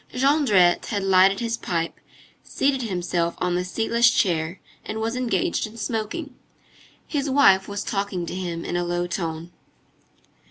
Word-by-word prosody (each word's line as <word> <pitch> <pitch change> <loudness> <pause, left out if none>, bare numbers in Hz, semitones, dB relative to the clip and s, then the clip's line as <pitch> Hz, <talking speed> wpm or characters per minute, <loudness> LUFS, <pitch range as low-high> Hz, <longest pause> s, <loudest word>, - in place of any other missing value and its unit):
Jondrette 250 - +3
had 205 -4 -2
lighted 195 +1 +4
his 230 0 -1
pipe, 170 -5 -3 0.4
seated 270 -1 0
himself 175 -5 -1
on 180 -1 -1
the 180 +1 0
seatless 230 +5 +2
chair, 170 -5 0 0.2
and 220 - -5
was 225 +2 -2
engaged 230 -5 0
in 220 +2 -13
smoking. 230 +8 -4 0.7
His 290 -2 -2
wife 230 -9 +5
was 200 0 -4
talking 195 -3 -2
to - - -6
him 175 -2 -4
in - - -3
a 175 - 0
low 175 0 -1
tone. 170 -1 -4
195 Hz, 150 wpm, -23 LUFS, 175-230 Hz, 0.7 s, wife